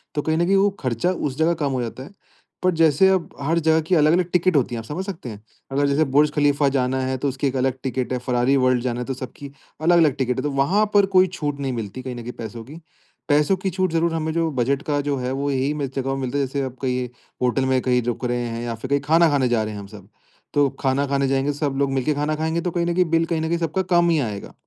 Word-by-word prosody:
तो 150 - +1
कहीं 160 +2 0
न 175 - +2
कहीं 195 +2 +2
वो 200 +1 +4
खर्चा, 130 +7 0
उस 145 -6 -3
जगह 160 +2 +3
कम 140 - 0
हो 130 -2 -1
जाता 120 +2 -6
है। 140 - -12 0.5
पर 185 - +4
जैसे 160 +3 +5
अब 190 -3 +1
हर 160 +4 +1
जगह 160 0 +3
की 185 - +3
अलग-अलग 165 +3 +3
टिकट 180 -1 +2
होती 125 -3 +1
है। 115 - -3
आप 110 - -8
समझ 175 +9 -4
सकते 165 - -6
हैं, 105 -1 -9 0.3
अगर 140 +1 +1
जैसे 140 +3 +2
बुर्ज 150 +1 +5
खलीफा 145 -1 +2
जाना 130 0 +1
है 130 0 -1
तो 140 - -2
उसकी 135 +2 -2
एक 135 - -3
अलग 130 0 0
टिकट 130 -1 -2
है, 125 - -1
फरारी 125 +2 +1
वर्ल्ड 130 -2 +2
जाना 120 -1 -2
है, 125 - -3
तो 135 - -3
सबकी 130 +2 -8 0.3
अलग-अलग 165 -4 +4
टिकट 125 -2 -1
है। - - 0
तो 145 - -1
वहाँ 140 +10 +2
पर 200 -1 +5
कोई 185 0 +6
छूट 145 -5 -4
नहीं 135 -2 -2
मिलती, 115 +1 -5
कहीं 130 -1 -6
न 120 - -7
कहीं 120 +1 -6
पैसों 115 0 -7
की। 150 +6 -11 0.5
पैसों 150 +5 +3
की 190 +1 -2
छूट 185 -1 -1
ज़रूर 165 0 +1
हमें 160 -1 -1
जो 165 0 +1
बजट 135 +1 0
का 145 -3 -1
जो 145 -1 -1
है 125 0 -3
वो, 140 +1 -1
यही 135 +2 0
में 145 -2 -2
जगहों 135 0 -1
में 135 - -4
मिलता 130 +2 -2
है, 140 - +1
जैसे 140 +1 -3
आप 130 -1 -5
कहीं 125 -1 -1 0.3
होटल 125 +1 +1
में 130 -1 +2
कहीं 125 -1 +2
रुक 120 +1 -3
रहे 120 0 -1
हैं, 115 0 -4
या 120 -1 -3
फिर 120 +3 -8
कहीं 140 0 +2
खाना 165 +1 +5
खाने 140 -3 +2
जा 115 -2 +1
रहे 110 0 -5
हैं 105 - -6
हम 100 - -9
सब। 100 -2 -13 0.5
तो 145 -1 +3
खाना 135 +1 +1
खाने 140 0 +1
जाएँगे, 135 +2 0
सब 145 -1 -2
लोग 140 -1 +1
मिलके 135 +3 +1
खाना 150 +2 -1
खाएँगे, 160 +2 -1
तो 180 - -2
कहीं 170 0 -1
न 170 - 0
कहीं 180 0 +3
बिल 165 0 +3
कहीं 165 -1 -1
न 160 - -1
कहीं 170 - +1
सबका 165 +2 -1
कम 175 0 +4
ही 165 -2 +3
आएगा। 105 -7 -4
140 Hz, 280 wpm, -22 LUFS, 130-160 Hz, 0.5 s, कोई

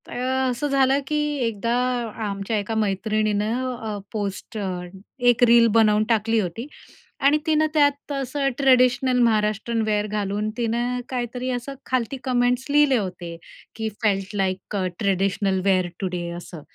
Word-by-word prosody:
तर - - -12
अ, 260 +1 0
असं 250 +4 -2
झालं 275 -1 +3
की 300 - -1 0.3
एकदा 230 +1 -2 0.5
आमच्या 200 +2 -2
एका 210 +2 -3
मैत्रिणीनं 215 +4 0
अ, 220 -3 -5
पोस्ट 205 0 -4
अ, 185 -3 -3 0.5
एक 245 0 +3
रील 235 -1 +6
बनवून 215 -1 +4
टाकली 225 0 +2
होती 205 +6 -4 0.5
आणि 280 +2 +5
तिनं 310 0 +3
त्यात 285 -1 +2
असं 275 0 -1
ट्रेडिशनल 255 -1 +3
महाराष्ट्रीयन 220 0 +1
वेअर 210 -1 0
घालून 210 0 -2
तिनं 240 +1 -1
काहीतरी 250 0 -3
असं 245 +2 -4
खालती 255 0 -1
कमेंट्स 250 0 +1
लिहिले 290 -2 +4
होते, 180 -4 -5 0.4
की 220 0 -2
felt 200 -1 0
like 190 0 -2
a 190 -2 0
traditional 195 -1 +1
wear 185 -2 +3
today 180 -2 -3
असं. 170 -2 -9
225 Hz, 145 wpm, -23 LUFS, 200-255 Hz, 0.5 s, रील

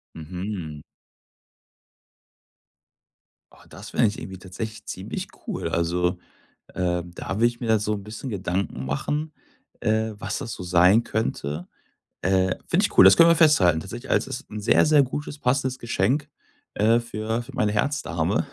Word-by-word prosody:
Mhm. 85 -2 -6 2.7
Oh, - - -19
das - - -10
fände 115 - +3
ich 105 - -6
irgendwie 95 -1 -7
tatsächlich 105 +4 -7
ziemlich - - -5 0.2
cool. - - -3
Also, 90 +1 0 0.6
ähm, 90 -1 -1
da 95 - -4
würde 115 +3 +4
ich 120 +1 -2
mir 120 - -3
da 110 -1 +4
so 105 +1 -1
'n 100 - -6
bisschen 110 +6 -7
Gedanken 95 - -2
machen, 150 - -2 0.5
äh, 110 0 +1
was 105 -2 -3
das 115 - -5
so - - -7
sein 90 +5 +5
könnte. 85 -8 -3 0.6
Äh, 95 0 +2
finde - - +2
ich - - -5
cool, 95 - +10
das 95 - +8
können 165 0 +8
wir 170 - +6
festhalten 100 - +5
tatsächlich. 120 +10 -8
Also, - - +1
das 130 - -4
ist - - -30
'n 105 - -5
sehr, 100 - +4
sehr 150 -2 +5
gutes, 145 +3 -5
passendes 130 0 0
Geschenk, 125 +7 0 0.4
äh, 115 +3 +3
für 115 0 -3
für - - -13
meine 105 -1 +1
Herzdame. 105 - 0
105 Hz, 160 wpm, -24 LUFS, 90-120 Hz, 2.7 s, cool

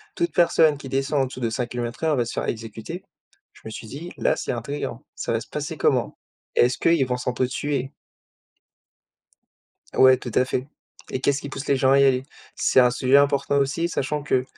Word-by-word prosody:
toute 345 0 -1
personne 160 -3 +4
qui 135 -1 -9
descend 135 +2 0
en - - +2
dessous 130 - -9
de 120 -2 0
5 120 +1 -3
kilomètres 120 +3 -5
heure 160 -2 +3
va 120 - +1
se 115 - -6
faire - - -2
exécuter. 115 - -6 0.5
Je - - -19
me - - -5
suis 110 - -8
dit: 155 +9 -8
«Là - - +2
c'est - - -3
intriguant. 120 0 -4
Ça - - -3
va 115 - +1
se 115 - -10
passer 150 +2 -5
comment? 130 -3 +1 0.4
Est-ce 125 +1 +3
qu'ils 165 -5 +3
vont 125 0 -1
s'entretuer?» 130 +2 -2 2.0
Ouais, 130 0 +7
tout 120 - -7
à - - +5
fait, 130 +1 -2 0.4
et 130 - -2
qu'est-ce 140 +1 +2
qui 140 - -6
pousse 135 +1 -6
les 140 - +3
gens 130 0 +3
à 140 - +6
y - - +6
aller? 130 -1 +3 0.3
C'est - - +3
un 125 -1 +6
sujet 130 +2 +3
important 140 0 +2
aussi 150 +5 0
sachant 150 -2 -2
que, 130 -3 +1
135 Hz, 205 wpm, -24 LUFS, 125-145 Hz, 2.0 s, Ouais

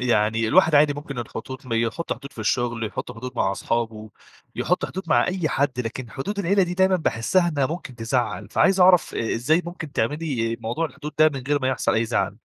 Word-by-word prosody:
يعني 110 -2 +2
الواحد 160 +2 +5
عادي 145 0 +5
ممكن 145 -2 -7
الخطوط 125 +3 -7
مي 115 -2 0
يحط 140 +9 -2
حدود 140 +4 -9
في - - -18
الشغل، 120 +1 0
يحط - - -5
حدود 125 +3 -7
مع 95 -4 +1
أصحابه، 110 0 -3 0.5
يحط 180 - 0
حدود 190 - -6
مع 120 -4 +4
أي 180 -3 -1
حد، 135 -3 0
لكن 120 0 -5
حدود 195 - -4
العيلة 200 +1 +3
دي 180 -1 -1
دايمًا 190 0 +3
باحسها 175 +4 +1
إنها 145 -5 +1
ممكن 160 -3 -6
تزّعل. 115 -4 -2
فعايز 190 - +3
أعرف 180 -1 +5
أ 115 - -1
إزاي 155 +9 +2
ممكن 170 -4 -7
تعملي 120 -3 -1
موضوع 120 +9 -1
الحدود 150 0 -8
ده، 155 0 +7
من 135 - -5
غير 145 0 +2
ما 130 - +1
يحصل 130 - 0
أي 110 - +2
زعل؟ 115 +1 -1
130 Hz, 205 wpm, -23 LUFS, 115-165 Hz, 0.5 s, ده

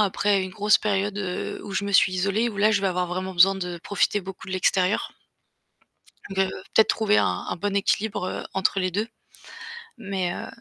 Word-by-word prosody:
après 200 -1 +2
une 185 - -5
grosse 210 +1 +3
période, 200 -1 -1
heu, 185 -3 -4
où 205 - -9
je 200 - -1
me 200 - -3
suis 195 - +5
isolée 200 +5 0
où 210 - -8
là 210 +2 +3
je 205 - +2
vais 195 - +1
avoir 180 0 -1
vraiment 185 +2 -4
besoin 185 +2 +5
de 180 -2 -5
profiter 205 +1 0
beaucoup 190 0 -9
de - - -5
l'extérieur. 185 +1 +1 1.2
De 195 - -7 0.4
peut-être 220 - +5
trouver 215 -1 +2
un - - +4 0.2
un - - -2
bon 200 +3 -2
équilibre, 200 0 0
heu, - - -4
entre 190 +1 +1
les 185 -1 0
2, 205 +5 -2 0.9
mais 190 -3 -2
heu, - - -6
195 Hz, 200 wpm, -24 LUFS, 185-205 Hz, 1.2 s, suis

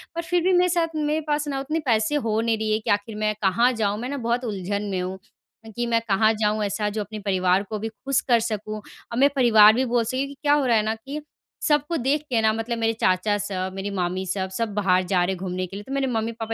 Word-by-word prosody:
पर 335 - -1
फिर 350 +1 0
भी 370 0 +3
मेरे 360 0 +4
साथ 330 -2 0
मेरे 305 +1 0
पास 295 0 0
ना 275 -1 -2
उतने 305 +4 -2
पैसे 225 +3 +2
हो 225 -6 0
नहीं 230 -1 +1
रही 215 0 -2
है 215 - +2
कि - - -6
आखिर 205 +2 -1
मैं 215 0 0
कहाँ 235 +6 +3
जाऊँ। 210 -2 -1
मैं 250 - -4
ना 285 - -3
बहुत 240 +1 -1
उलझन 200 -1 -3
में 185 -1 -1
हूँ, 185 +1 -4 0.6
कि 240 0 -1
मैं 230 -1 +2
कहाँ 215 +2 +3
जाऊँ 210 0 +1
ऐसा 210 +1 -1
जो 210 +1 -3
अपने 215 +1 -6
परिवार 190 -1 +1
को 215 -1 -3
भी 225 +1 -3
खुश 270 +5 -1
कर 235 -1 +5
सकूँ 215 -1 -3
और 230 +2 -10
मेरा 280 +1 +4
परिवार 220 -4 +7
भी 260 +3 +1
बोल 240 -1 +1
सके 255 +4 -1
कि 280 0 -11
क्या 290 0 +4
हो 290 -2 +2
रहा 235 -2 +3
है 210 - +2
ना 220 +1 -1
कि 275 +7 -7 0.5
सबको 295 +2 +1
देख 275 +4 +1
के 230 -3 +2
ना 220 0 +4
मतलब 225 +1 -3
मेरे 225 0 +1
चाचा 185 +3 +2
सब 190 -2 -3
मेरी 195 +1 -4
मामी 185 0 -2
सब, 190 0 -2
सब 215 +2 -3
बाहर 185 -3 +2
जा 180 -1 +1
रहे 190 +2 0
हैं - - -6
घूमने 185 0 -3
के 195 - -10
लिए 205 - -6
तो - - -8
मेरे 275 -1 0
मम्मी-पापा 225 -1 -2
220 Hz, 265 wpm, -24 LUFS, 205-260 Hz, 0.6 s, परिवार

